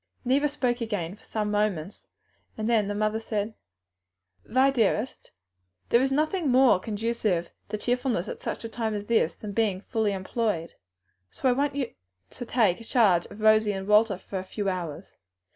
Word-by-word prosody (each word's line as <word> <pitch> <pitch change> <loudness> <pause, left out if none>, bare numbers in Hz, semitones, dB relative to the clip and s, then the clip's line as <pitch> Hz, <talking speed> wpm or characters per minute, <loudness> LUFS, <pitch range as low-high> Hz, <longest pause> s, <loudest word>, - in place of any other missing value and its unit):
Neither 275 +4 +3
spoke 250 -4 -1
again 205 -6 -3
for 210 - -24
some 210 -1 -2
moments, 205 -4 -1 0.5
then 215 -1 +1
the 205 - -2
mother 215 +1 0
said, 220 -1 -3 0.9
"Vi, 260 +3 +3
dearest, 230 -1 0 0.6
there 235 - +5
is 270 +1 +1
nothing 310 +3 +1
more 250 -6 +5
conducive 210 -4 -1 0.2
to 215 - -2
cheerfulness 245 -4 -1
at - - -6
such - - -4
a - - -3
time 225 -1 -2
as 205 0 -4
this 225 -7 +2
than 210 - -7
being 200 -3 0
fully 220 -1 0
employed. 190 -3 -2 0.6
So 255 -2 +1
I 280 +2 +2
ask 285 -1 -4
you 265 -4 -2 0.4
to 245 - -7
take 220 -4 +2
charge 195 -8 +3
of 210 - -11
Rosie 215 -1 +5
and 190 0 -5
Walter 210 -1 +4
for 190 +1 -6
a - - -5
few 200 +2 -4
hours. 175 -5 -5
215 Hz, 170 wpm, -27 LUFS, 200-240 Hz, 0.9 s, there